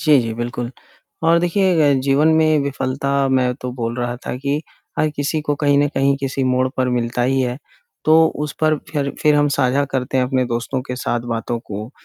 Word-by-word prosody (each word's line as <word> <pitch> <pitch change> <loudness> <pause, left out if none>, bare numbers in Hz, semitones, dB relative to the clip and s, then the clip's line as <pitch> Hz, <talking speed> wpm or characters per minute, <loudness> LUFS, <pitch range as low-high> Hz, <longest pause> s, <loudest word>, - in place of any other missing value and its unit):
जी, 150 -2 +5
जी, 115 -1 -3
बिल्कुल। 120 +1 -4 0.5
और 165 +1 +4
देखिए 175 -4 +3
अ, - - +3
जीवन 140 +4 +3
में 155 -1 +4
विफलता 140 0 -1
मैं 125 -1 +2
तो 125 - -4
बोल 120 -1 -3
रहा 120 0 -2
था - - -2
कि 140 +4 -2 0.4
हर 155 - +3
किसी 145 +2 -1
को 145 -1 0
कहीं 145 -1 +4
न 145 - +3
कहीं 135 0 +2
किसी 135 0 -1
मोड़ 130 0 +2
पर 130 -1 +1
मिलता 120 0 -1
ही 135 +2 +2
है, 125 -1 -1 0.5
तो 160 +1 +6 0.2
उस 150 - -5
पर 155 -1 +3
फिर 145 -3 -1
फिर 150 -1 +5
हम 145 0 +3
साझा 135 +1 +2
करते 130 0 -1
हैं 130 - +3
अपने 130 0 0
दोस्तों 120 +2 -2
के 125 -1 -6
साथ 120 -1 -1
बातों 115 +1 -3
को, 110 0 -7
135 Hz, 210 wpm, -19 LUFS, 125-145 Hz, 0.5 s, तो